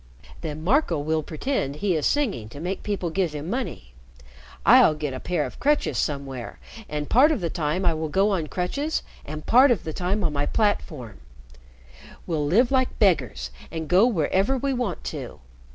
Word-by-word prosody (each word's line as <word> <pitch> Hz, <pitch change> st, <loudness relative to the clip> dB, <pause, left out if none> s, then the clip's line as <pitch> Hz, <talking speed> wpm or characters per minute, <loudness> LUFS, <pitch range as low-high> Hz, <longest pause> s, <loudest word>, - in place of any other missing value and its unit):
"Then 155 Hz, 0 st, -5 dB
Marco 215 Hz, -, +2 dB
will 155 Hz, +2 st, 0 dB
pretend 155 Hz, -, -2 dB
he 180 Hz, +3 st, 0 dB
is 155 Hz, -, +1 dB
singing 210 Hz, -, -1 dB
to 140 Hz, -, -10 dB
make 180 Hz, +4 st, -3 dB
people 195 Hz, -5 st, -2 dB
give 175 Hz, -2 st, 0 dB
him 150 Hz, +1 st, -5 dB
money. 220 Hz, -, -4 dB, 0.7 s
I'll 155 Hz, -, +7 dB
get 150 Hz, -3 st, -4 dB
a 130 Hz, -, -5 dB
pair 180 Hz, +5 st, -1 dB
of -, -, -9 dB
crutches 290 Hz, +4 st, +1 dB
somewhere, 135 Hz, -4 st, -4 dB, 0.3 s
and 150 Hz, -1 st, -3 dB
part 280 Hz, +6 st, +5 dB
of 295 Hz, -, 0 dB
the 170 Hz, -3 st, -2 dB
time 170 Hz, +2 st, -1 dB
I 170 Hz, -, +3 dB
will 160 Hz, 0 st, -3 dB
go 195 Hz, +6 st, +2 dB
on 170 Hz, -6 st, -1 dB
crutches 280 Hz, -, -2 dB, 0.2 s
and 155 Hz, +1 st, -6 dB
part 260 Hz, +4 st, +6 dB
of 235 Hz, -8 st, +1 dB
the 160 Hz, -, -5 dB
time 190 Hz, +5 st, -1 dB
on 160 Hz, -4 st, 0 dB
my 145 Hz, 0 st, -1 dB
platform. 155 Hz, -, -1 dB, 1.1 s
We'll 155 Hz, -4 st, -1 dB
live 235 Hz, -, +3 dB
like 260 Hz, -1 st, +1 dB
beggars 125 Hz, -, +1 dB, 0.2 s
and 160 Hz, -1 st, -5 dB
go 190 Hz, +8 st, +5 dB
wherever 195 Hz, -, +1 dB
we 275 Hz, +2 st, -1 dB
want 240 Hz, -9 st, -3 dB
to. -, -, -7 dB
170 Hz, 185 wpm, -24 LUFS, 150-215 Hz, 1.1 s, I'll